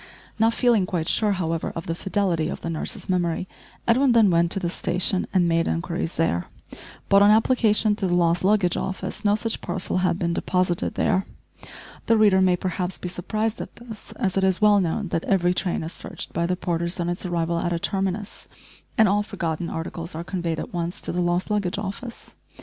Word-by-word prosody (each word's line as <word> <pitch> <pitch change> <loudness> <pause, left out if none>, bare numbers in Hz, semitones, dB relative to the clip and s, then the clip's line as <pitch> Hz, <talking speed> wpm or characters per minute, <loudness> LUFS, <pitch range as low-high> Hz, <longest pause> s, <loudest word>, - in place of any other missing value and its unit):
Not 225 +1 +3
feeling 235 -7 +3
quite 165 -3 -2
sure 210 -2 +3
however 165 -3 -2
of 165 - -5
the 165 - -2
fidelity 175 -3 0
of - - -5
the 165 - -3
nurse's 160 - -4
memory, 180 -1 0 0.4
Edwin 250 +2 +4
then 220 -5 +5
went 170 0 +3
to - - -1
the 180 - -2
station 180 +2 0
and 180 -3 +3
made 165 0 +2
inquiries 170 0 -2
there, 90 - 0 0.6
but 200 0 +5
on 205 - +7
application 220 -1 +3
to 195 - -1
the 175 - +1
lost 170 0 +2
luggage 195 -3 +3
office 190 +2 -4
no 205 -1 +4
such 225 +1 -3
parcel 175 - -2
had 180 -2 +1
been 170 -2 -1
deposited 180 0 0
there. 190 - +1 0.8
The 230 - +4
reader 205 -3 +5
may 185 -1 +4
perhaps 180 0 -3
be 180 - -5
surprised 215 +5 -2
at - - -8
this, 235 -2 -10
as 195 -5 -1
it 195 - +2
is 190 -1 +2
well 210 -1 +5
known 185 +3 -2
that 165 - -1
every 180 -2 +2
train 180 -2 -1
is 160 - -5
searched 190 - -7
by 170 0 0
the 180 - 0
porters 170 0 -2
on 170 - -1
its 175 +1 -3
arrival 170 -2 -1
at 175 - -1
a 170 - 0
terminus, 195 +3 -3 0.5
and 220 - +6
all 205 +2 +2
forgotten 170 -5 -3
articles 165 0 -5
are 165 - -4
conveyed 170 -3 -3
at - - -6
once 175 +3 -3
to - - -2
the 180 - -1
lost 175 +3 0
luggage 200 -4 0
office. 210 +4 -6
185 Hz, 205 wpm, -24 LUFS, 170-205 Hz, 0.8 s, on